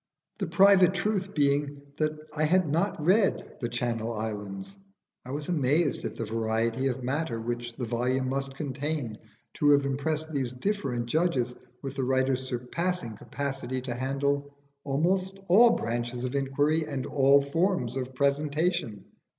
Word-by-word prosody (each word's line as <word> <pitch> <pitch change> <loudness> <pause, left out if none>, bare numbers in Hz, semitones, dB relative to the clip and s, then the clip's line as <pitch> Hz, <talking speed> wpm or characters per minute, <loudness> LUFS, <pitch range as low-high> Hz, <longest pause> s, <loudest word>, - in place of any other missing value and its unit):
The - - -1
private 190 -1 +6
truth 195 0 -1
being 145 -1 +1 0.2
that 155 0 0 0.2
I 155 0 +2
had 180 +2 +3
not 170 +7 0
read 195 +3 +2
'The 120 - -1
Channel 120 -1 -2
Islands,' 105 - -5 0.5
I 125 - -11
was 145 +2 -4
amazed 150 -1 +1
at - - -4
the 115 - -3
variety 115 +3 0
of 130 -1 -2
matter 130 -2 -1
which 120 +1 -4
the 125 - -3
volume 125 +3 0
must 135 +1 -2
contain 140 -4 -3 0.4
to 145 - +4
have 140 -1 +5
impressed 155 +3 -2
these 130 -4 -1
different 130 - -1
judges 130 -3 +1 0.3
with 135 0 -5
the 135 - 0
writer's 130 0 +1
surpassing 130 +1 -2
capacity 135 +1 -4
to 125 -2 -3
handle 140 +2 -1 0.3
almost 185 +7 0
all 230 +7 +7
branches 120 +1 -3
of 130 0 -2
inquiry 145 +3 +1
and 140 -3 -4
all 140 0 +5
forms 140 - 0
of 130 -1 -4
presentation. 145 - 0
140 Hz, 150 wpm, -28 LUFS, 125-155 Hz, 0.5 s, all